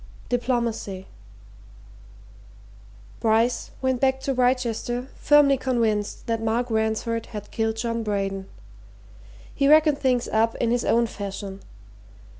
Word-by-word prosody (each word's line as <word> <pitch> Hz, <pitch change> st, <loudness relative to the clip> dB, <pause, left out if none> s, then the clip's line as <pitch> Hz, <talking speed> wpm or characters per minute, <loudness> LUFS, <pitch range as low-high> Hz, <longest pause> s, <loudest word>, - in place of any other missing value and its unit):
DIPLOMACY 235 Hz, -6 st, -1 dB, 2.1 s
Bryce 225 Hz, +2 st, +1 dB
went 260 Hz, -2 st, 0 dB
back 265 Hz, 0 st, +2 dB
to 270 Hz, 0 st, -1 dB
Wrychester 250 Hz, 0 st, 0 dB
firmly 290 Hz, -2 st, +4 dB
convinced 230 Hz, -5 st, -1 dB
that 230 Hz, -2 st, -1 dB
Mark 230 Hz, +2 st, -1 dB
Ransford 220 Hz, +1 st, -1 dB
had 210 Hz, -3 st, -8 dB
killed 225 Hz, 0 st, -1 dB
John 230 Hz, 0 st, -2 dB
Braden. 195 Hz, -2 st, -2 dB, 1.1 s
He 275 Hz, -, +1 dB
reckoned 305 Hz, -1 st, +5 dB
things 250 Hz, -3 st, +1 dB
up 225 Hz, +1 st, +1 dB
in 235 Hz, -, 0 dB
his 245 Hz, 0 st, +1 dB
own 235 Hz, +1 st, +3 dB
fashion. 200 Hz, -2 st, -6 dB
230 Hz, 110 wpm, -24 LUFS, 220-255 Hz, 2.1 s, reckoned